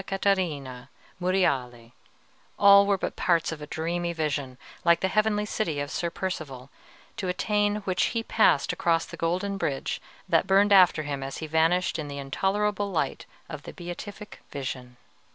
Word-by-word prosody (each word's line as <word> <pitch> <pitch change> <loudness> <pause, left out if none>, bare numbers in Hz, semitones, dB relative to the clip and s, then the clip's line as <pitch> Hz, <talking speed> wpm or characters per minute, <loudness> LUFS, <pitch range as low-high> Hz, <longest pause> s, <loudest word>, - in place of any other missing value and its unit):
Catarina, 155 -10 -1 0.3
Monreale, 130 -11 0 0.7
all 200 0 +7
were 200 -1 +3
but - - -4
parts 170 -2 +1
of 155 -2 -7
a 150 - -7
dreamy 170 +3 -2
vision, 145 -5 -2 0.3
like 170 0 +4
the 190 - +2
heavenly 210 +1 +1
city 170 -8 -2
of 145 +1 -4
Sir 170 - -1
Percivale, 150 -8 -5 0.5
to 190 - -3
attain 205 +3 +1
which 185 -2 0
he 230 -1 -1
passed 215 -11 +3
across 165 -1 +1
the - - -9
golden 185 +4 -1
bridge 135 -6 -2 0.3
that - - +2
burned 200 +1 +4
after 180 -5 +6
him 140 -2 -4
as 135 0 -5
he 160 - -5
vanished 160 +2 +1
in 150 - -4
the 140 0 -6
intolerable 200 +9 -1
light 155 -7 -2 0.2
of 155 -3 -7
the - - -10
Beatific 200 +4 -8
Vision. 125 -3 -6
170 Hz, 160 wpm, -26 LUFS, 145-195 Hz, 0.7 s, all